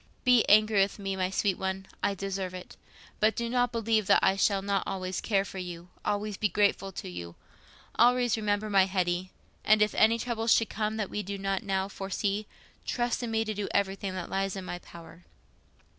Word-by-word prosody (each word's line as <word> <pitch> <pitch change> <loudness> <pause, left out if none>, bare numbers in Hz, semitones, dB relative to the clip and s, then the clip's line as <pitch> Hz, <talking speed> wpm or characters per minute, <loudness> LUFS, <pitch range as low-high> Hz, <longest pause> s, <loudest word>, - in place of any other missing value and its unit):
Be 250 -3 +5
angry 215 -1 +5
with 195 - 0
me, 195 -1 -3
my 185 -1 0
sweet 195 0 0
one, 190 0 -3 0.2
I 200 - 0
deserve 195 -1 -4
it; 180 - -9 0.4
but 215 0 +3
do 235 - -2
not 245 +1 +1
believe 225 -3 +1
that - - +5
I 190 - +4
shall 195 0 +2
not 200 -1 0
always 185 -1 -3
care 195 -3 +1
for 190 - -7
you—always 185 +4 -4
be 210 - +1
grateful 195 0 +1
to - - -6
you—always 225 - -1
remember 210 -1 -1
my 195 -2 +4
Hetty; 185 -1 -1 0.3
and 215 0 +5
if 210 0 +2
any 225 +1 +4
trouble 230 -1 -3
should 225 -1 +4
come 215 0 -2
that 210 -3 -3
we 210 - -2
do 200 0 -5
not 195 0 -1
now 195 -2 -1
foresee, 200 +1 -3 0.4
trust 240 0 -1
in 240 - -3
me 225 0 0
to 215 - -2
do 205 -1 -3
everything 195 -1 -1
that 185 -2 -5
lies 195 0 -1
in 190 -1 -6
my 175 - -5
power. 170 0 -13
200 Hz, 195 wpm, -29 LUFS, 190-215 Hz, 0.4 s, Be